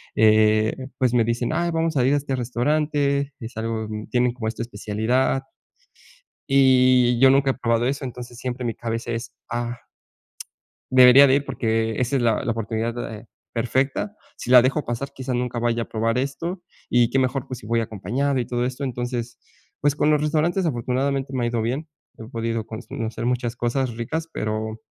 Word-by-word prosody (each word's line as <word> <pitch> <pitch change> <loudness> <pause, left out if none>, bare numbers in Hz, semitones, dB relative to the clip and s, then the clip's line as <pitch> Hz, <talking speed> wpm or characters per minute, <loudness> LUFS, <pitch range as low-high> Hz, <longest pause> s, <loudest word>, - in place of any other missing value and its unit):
eh, 110 0 +4 0.3
pues 125 -2 +2
me 120 - +4
dicen: 115 +1 -1
"Ay, 170 0 0
vamos 165 -1 0
a 125 - +3
ir 135 - +3
a - - +4
este 135 -1 -2
restaurante, 140 +3 0
es 115 -1 -9
algo 110 -1 -2 0.2
tienen 125 0 +2
como 120 -3 -5
esta 110 +1 -4
especialidad", 115 +4 0 1.0
y 130 -3 +4
yo 135 0 +7
nunca 135 0 +3
he - - -10
probado 115 -1 0
eso, 140 +2 -2
entonces 125 -1 -8
siempre 125 0 -4
mi 115 - -2
cabeza 115 0 -4
es: 115 0 -5 0.2
"Ah 120 +1 -3 1.1
debería 130 +2 +8
de 130 - +5
ir 140 - -1
porque 115 -3 -1
esa 125 +2 +1
es 130 - 0
la 115 -3 +2
la 125 - -1
oportunidad, 115 +1 -3
eh, 110 +2 -11 0.3
perfecta, 130 - -1 0.2
si - - -6
la 125 -1 +9
dejo 140 +4 0
pasar, 120 +4 -4
quizás 130 -1 -4
nunca 125 -1 -2
vaya 120 0 0
a - - -3
probar 115 +2 0
esto, 165 +7 -3 0.3
y 120 -1 +3
qué 135 - +1
mejor 130 +1 -1
pues 130 -2 -6
si 110 - -12
voy 115 +1 +1
acompañado", 115 +6 -2
y 120 - -1
todo 120 0 -1
esto, 130 +2 -4
entonces, 120 -2 -4 0.4
pues 145 0 +2
con 150 0 +2
los 150 -1 +3
restaurantes 160 +5 +1
afortunadamente 135 +1 -1
me 130 -2 -1
ha - - +1
ido 120 -1 -1
bien, 135 +8 -2 0.3
he 110 - -8
podido 115 -1 -3
pues 110 +1 -8
conocer 115 -4 -4
muchas 120 -1 -1
cosas 120 0 -1
ricas, 160 +8 -3
pero 110 +1 -3
125 Hz, 190 wpm, -23 LUFS, 115-135 Hz, 1.1 s, la